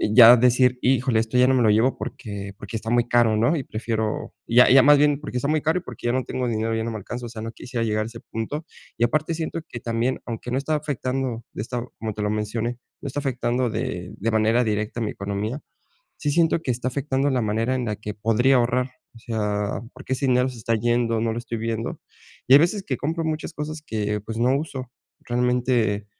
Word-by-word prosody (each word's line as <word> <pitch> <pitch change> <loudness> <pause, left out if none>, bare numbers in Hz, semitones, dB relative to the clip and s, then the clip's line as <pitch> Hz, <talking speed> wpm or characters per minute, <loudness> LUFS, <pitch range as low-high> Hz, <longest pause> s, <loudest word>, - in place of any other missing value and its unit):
ya 120 0 +11
decir 125 +1 +3
híjole, 125 -2 +2
esto 115 +2 -1
ya 125 - +6
no 130 - +4
me 130 - +3
lo 110 - +4
llevo 115 +5 +3
porque 100 -4 -6
porque 100 +2 -8
está 110 +1 -6
muy 120 0 +2
caro, 120 -3 +3
¿no? 120 +9 +3
Y 140 - -3
prefiero 110 -1 -3
ya 120 +2 +6
ya 130 +1 +8
más 145 +1 +7
bien 145 0 +3
porque 125 -4 -4
está 130 - -1
muy 155 -1 +2
caro 160 +3 +1
y - - -15
porque, - - -6
ya 120 - +2
no 130 0 0
tengo 125 -1 -2
dinero 115 -1 -1
ya 110 - -1
no 115 - -2
me 110 - -4
alcanzo. 120 +4 -6
O - - -8
sea, 110 -1 -8
no 115 - -5
quisiera 120 0 -4
llegar 110 -1 0
a - - -5
ese 115 0 -9
punto 145 +8 -5 0.3
y 115 - +1
aparte, 155 +6 0
siento 165 +1 -3
que 120 - -6
también, 115 +2 -1
aunque 120 +1 -5
no 125 - +1
está 140 +3 -1
afectando 130 -5 -2
de - - -4
esta 120 +1 -3 0.2
como 110 -1 -3
te 105 - -3
lo 105 - 0
mencioné, 110 +3 -2 0.2
no - - -5
está 140 +2 -3
afectando 125 -2 0
de 90 -5 -4
de 115 +3 -1
manera 110 +3 +3
directa 110 +1 -2
a - - +1
mi 105 - -2
economía. 100 +7 -4 0.6
Sí, 145 - -1
siento 165 +1 +2
que - - -2
está 125 +1 -2
afectando 135 +1 0
la 125 -2 +1
manera 115 +4 0
en 125 - -1
la 105 - -2
que 105 0 -6
podría 115 +5 +3
ahorrar. 125 +1 +1 0.2
O 115 - -13
sea, 105 -3 -2
porque, 130 0 -7
ese 135 +1 -1
dinero 125 0 +3
se 125 -2 -8
está 115 +1 0
yendo, 120 0 +1
no 115 0 0
lo 115 - -3
estoy 120 -1 -5
viendo, 115 0 -3 0.5
y 130 - +3
hay - - +11
veces 190 +4 +1
que 130 - -1
compro 160 +3 -2
muchas 155 +1 -3
cosas 155 +1 -5
que 105 -4 -2
pues, 110 +2 -6
no 125 +3 +3
uso 130 -4 -5 0.3
realmente, 120 -4 +1
120 Hz, 240 wpm, -24 LUFS, 110-130 Hz, 0.6 s, ya